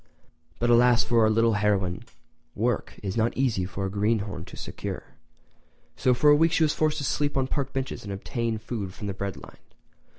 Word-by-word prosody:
But 120 0 +1
alas 120 0 +5
for 120 -1 +2
our 110 - +5
little 115 +1 +3
heroine—work 95 +1 -2
is 95 -2 -3
not 115 +1 +1
easy 120 -9 +1
for 95 +1 -4
a - - -2
greenhorn 100 -4 -1
to - - -12
secure, - - -6 0.8
so 125 -1 +2
for 145 +4 +5
a - - +7
week 165 +2 +3
she 165 - +3
was 150 - +2
forced 155 -1 +1
to 145 - -3
sleep 145 +1 0
on 135 - +2
park 135 0 -2
benches 135 0 -4
and 100 - -6
obtain 115 +3 -2
food 110 -4 -5
from 105 - -7
the 100 - -2
bread 100 0 -4
line. - - -13
115 Hz, 195 wpm, -26 LUFS, 100-130 Hz, 0.8 s, a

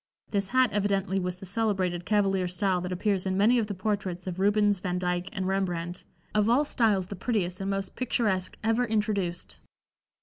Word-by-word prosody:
This 200 -2 0
hat 255 +3 +3
evidently 195 -1 +1
was 180 -1 -3
the 190 - -10
celebrated 190 -4 -1
cavalier 195 -3 +2
style 180 +1 0
that 180 +1 -4
appears 190 +1 0
in 190 0 0
many 230 +5 +4
of 220 - -1
the 205 - -4
portraits 190 -2 -2
of 185 -1 -4
Rubens, 205 0 +3
Vandycke 180 0 -2
and 190 -4 -3
Rembrandt, 180 -2 -2 0.3
of 210 +1 +3
all 265 +6 +4
styles 215 -9 +2
the 200 - -7
prettiest 190 -3 -1
and 195 - -2
most 195 -1 -3
picturesque 210 -7 0
ever 225 +2 +2
introduced. 210 -5 -1
195 Hz, 175 wpm, -28 LUFS, 180-210 Hz, 0.3 s, many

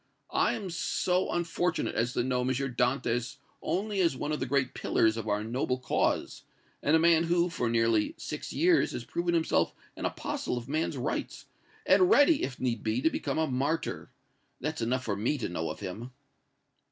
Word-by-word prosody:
I - - +3
am 195 -4 -5
so 180 +2 0
unfortunate 175 0 -1
as 115 +2 0
to - - 0
know 125 0 0
M. 125 - -1
Dantès 125 -2 0 0.2
only 200 +1 -1
as 165 -7 +2
one 145 - -3
of 150 - -1
the 130 - -2
great 130 -1 +1
pillars 110 0 +2
of 110 -1 -5
our 105 0 0
noble 125 +3 -1
cause, 130 - -1 0.4
and 150 - +3
a - - +5
man 165 0 +4
who, 175 +1 +2
for 125 -7 -1
nearly 115 -2 +2
six 150 - -6
years, 340 +1 +3
has 120 - -5
proven 170 +7 -1
himself 165 -1 +1 0.2
an - - -5
apostle 125 - -3
of 120 0 -6
man's 155 +3 -1
rights, - - -3 0.4
and 370 - +5
ready, 305 -5 +5
if 130 - -3
need 120 -4 -1
be, 110 +2 0
to 160 - +4
become - - -2
a 160 - +2
martyr! 145 +4 -2 0.5
That's 155 0 -3
enough 125 +3 0
for 105 -4 -1
me 115 +9 0
to 120 - -3
know 80 -2 -3
of 80 - -7
him!" 105 +6 -6
130 Hz, 190 wpm, -29 LUFS, 120-165 Hz, 0.5 s, a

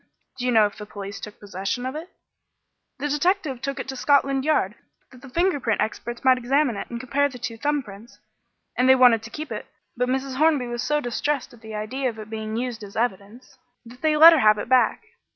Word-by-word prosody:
"Do 250 - -2
you - - +2
know 220 -3 +5
if 205 - -4
the 210 - -8
police 200 -1 -7
took 210 +1 -10
possession 200 +5 -4
of 260 +2 -4
it?" 325 +4 -7 0.9
"The 285 +2 -2
detective 295 -3 0
took 275 0 -4
it - - -5
to 265 - -4
Scotland 275 0 +2
Yard 285 -10 +1 0.4
that 250 -2 -16
the 270 - -12
finger 345 +2 +1
print 225 -4 -1
experts 235 +2 -3
might 260 -1 +5
examine 265 0 +1
it 200 - -6
and 235 - -5
compare 275 +3 0
the 255 - -10
two 230 -1 -5
thumb 290 +4 -1
prints; 210 +2 -13 0.6
and 255 +1 +2
they 260 - +8
wanted 245 -3 +5
to 225 - -10
keep 310 +4 -7
it, - - -5 0.3
but 250 +1 -1
Mrs. 265 0 -2
Hornby 300 -3 +3
was 240 0 -4
so 295 +3 0
distressed 265 +3 -2
at 235 - -17
the 220 -2 -8
idea 255 +5 -2
of 225 - -9
its 215 0 -10
being 220 0 -4
used 240 -2 -3
in 205 0 -9
evidence 225 +1 -4 0.3
that 245 +2 -14
they 310 -1 +2
let 330 +2 +10
her 320 - +3
have 215 -3 +5
it 205 - -5
back. 255 - +3
250 Hz, 230 wpm, -24 LUFS, 220-280 Hz, 0.9 s, let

